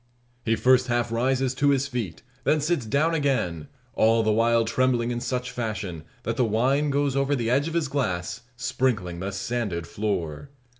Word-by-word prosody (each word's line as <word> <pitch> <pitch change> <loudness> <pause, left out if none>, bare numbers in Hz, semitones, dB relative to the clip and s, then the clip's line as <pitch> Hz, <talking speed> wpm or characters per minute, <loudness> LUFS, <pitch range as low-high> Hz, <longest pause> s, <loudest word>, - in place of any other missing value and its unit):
He 115 0 +2
first 130 +1 +4
half 120 -1 0
rises 130 +2 +1
to 145 +2 +2
his 140 0 +2
feet, 115 - -4 0.2
then 155 - +3
sits 150 -5 0
down 150 +7 +2
again; 130 - 0 0.3
all 115 +1 +3
the 110 - +2
while 115 +1 +3
trembling 120 0 +1
in 120 - -2
such 125 +1 -3
fashion, 105 -9 -4 0.2
that 115 0 -2
the 125 - +3
wine 130 +7 +2
goes 140 -1 +1
over 140 +1 +2
the 120 -3 -1
edge 140 +4 +2
of 165 - -4
his 165 -3 +1
glass, 115 -6 -2
sprinkling 110 -9 -1
the 95 +2 -3
sanded 100 -4 -2
floor. 90 - -3
120 Hz, 180 wpm, -25 LUFS, 110-135 Hz, 0.3 s, first